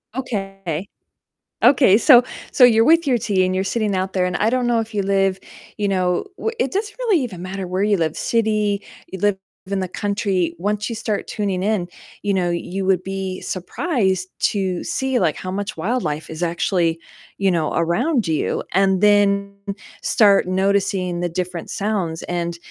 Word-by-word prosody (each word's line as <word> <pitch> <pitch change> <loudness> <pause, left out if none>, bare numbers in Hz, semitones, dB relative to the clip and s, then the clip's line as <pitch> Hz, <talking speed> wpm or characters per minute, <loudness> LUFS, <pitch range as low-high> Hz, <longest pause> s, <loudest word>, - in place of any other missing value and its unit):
Okay. 195 - -4 0.8
Okay, 255 -8 +6
so 245 -1 +7 0.3
so 255 - +4
you're 225 -2 +6
with 325 0 +4
your 250 - +3
tea, 200 -4 +1
and 185 0 0
you're 190 - 0
sitting 210 -1 -1
out 190 +1 -2
there 185 -1 +1
and 175 - -2
I 220 +2 +2
don't 250 -1 +1
know 235 -1 +2
if 225 0 -4
you 205 - 0
live, 195 -1 +1 0.4
you 205 -1 0
know, 185 - 0
wh - - -1
it - - 0
doesn't 410 +2 -2
really 445 -8 +2
even 185 -8 -6
matter 190 +1 -5
where 185 +2 -2
you 205 -1 +2
live, 160 -2 -1
city, 215 -3 0 0.3
you 190 - -5
live 205 0 +2 0.3
in 195 +1 -2
the 185 - -2
country. 195 -4 -1
Once 210 +2 -1
you 230 - -4
start 220 -2 -3
tuning 195 -3 -2
in, 200 -3 0 0.3
you 205 -1 0
know, 180 -2 +1
you 180 +3 -3
would 185 -1 +2
be 190 -1 -4
surprised 190 - -1
to 190 -3 0
see, 265 -1 0
like, 165 -5 +1
how 185 - -6
much 200 +2 -4
wildlife 160 -5 -2
is 160 +2 -7
actually, 170 -1 0 0.4
you 195 -1 +2
know, 160 -3 0
around 215 - +1
you, 155 - -1
and 190 0 +3
then 200 -1 +3 0.5
start 200 -4 +4
noticing 190 -2 0
the 175 - 0
different 175 0 -4
sounds, 195 -6 -2
and 170 -1 -2
195 Hz, 180 wpm, -21 LUFS, 180-215 Hz, 0.8 s, so